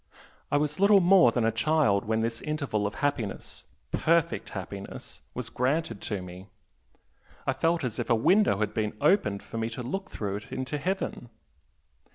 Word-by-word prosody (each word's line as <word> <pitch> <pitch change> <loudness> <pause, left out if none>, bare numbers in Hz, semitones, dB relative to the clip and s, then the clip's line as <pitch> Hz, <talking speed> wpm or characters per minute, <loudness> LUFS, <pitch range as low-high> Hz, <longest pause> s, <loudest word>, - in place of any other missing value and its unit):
I 145 - +4
was 150 +2 -1
little 200 0 +7
more 180 -7 +6
than 115 -1 +1
a 115 - +3
child 120 -4 +2
when 110 +1 +1
this 115 0 -2
'interval' 140 -9 -1
of 105 - -6
happiness 115 -8 -3 0.3
PERFECT 170 +1 +1
happiness! 100 -1 -7
was - - -4
granted 130 - -1
to 100 -4 -3
me 90 +2 -10 1.0
I - - +1
felt 165 -1 +1
as 120 -4 -3
if - - -3
a 120 - +5
window 160 - +3
had 105 -1 0
been 105 -1 -2
opened 140 - +2
for 115 - -6
me 115 0 -1
to 125 +2 -6
look 190 +10 -4
through 100 -2 -3
it 105 - -11
into 130 +3 -3
heaven!" 185 -7 -3
120 Hz, 175 wpm, -28 LUFS, 105-160 Hz, 1.0 s, little